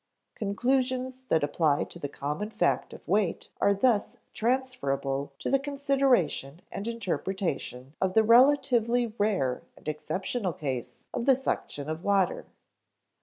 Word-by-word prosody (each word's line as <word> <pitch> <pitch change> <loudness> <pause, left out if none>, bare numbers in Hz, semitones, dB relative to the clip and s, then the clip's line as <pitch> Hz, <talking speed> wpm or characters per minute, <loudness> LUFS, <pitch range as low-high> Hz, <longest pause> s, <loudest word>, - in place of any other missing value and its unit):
Conclusions 255 +4 -1
that 160 - +3
apply 145 0 +2
to 175 - -10
the 145 - -4
common 150 +10 -3
fact 220 0 0
of - - -12
weight 195 0 0
are 200 - +5
thus 220 0 +2 0.2
transferable 145 - -1
to 155 - -3
the 275 - +4
consideration 270 - +1
and 205 - -5
interpretation 185 - -3
of 190 -1 +1
the 220 - +6
relatively 245 -1 +4
rare 190 -12 +1 0.2
and - - -16
exceptional 185 +6 -2
case 130 -6 -5
of 235 - -3
the 270 - +7
suction 150 - -3
of 155 +2 -4
water. 195 -3 +1
205 Hz, 130 wpm, -28 LUFS, 155-250 Hz, 0.2 s, the